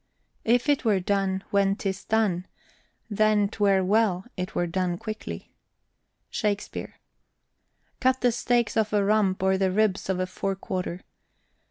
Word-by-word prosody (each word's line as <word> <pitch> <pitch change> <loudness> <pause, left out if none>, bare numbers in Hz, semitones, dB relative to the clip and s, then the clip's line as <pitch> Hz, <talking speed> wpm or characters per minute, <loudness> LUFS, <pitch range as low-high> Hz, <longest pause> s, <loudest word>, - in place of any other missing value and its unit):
If 245 +4 +3
it 290 -2 +2
were 210 -5 +3
done, 190 0 0
when 195 -1 +3
'tis 195 -2 -4
done, 205 -5 +1 0.6
then 215 -1 +3
'twere 200 -2 +2
well, 195 -2 +2
It 185 0 -5
were 175 - +1
done 175 0 -1
quickly. 215 +1 -7 0.8
SHAKSPEARE. 205 -1 -3 1.0
Cut 260 0 +2
the 245 - +4
steaks 240 -1 +1
off 215 -1 +1
a 205 -1 +3
rump 200 -3 +2
or 190 0 +2
the 190 -1 +2
ribs 200 -1 +1
of 185 -1 0
a 185 - +1
fore 195 +1 -3
quarter. 185 -2 -4
200 Hz, 145 wpm, -26 LUFS, 190-215 Hz, 1.0 s, the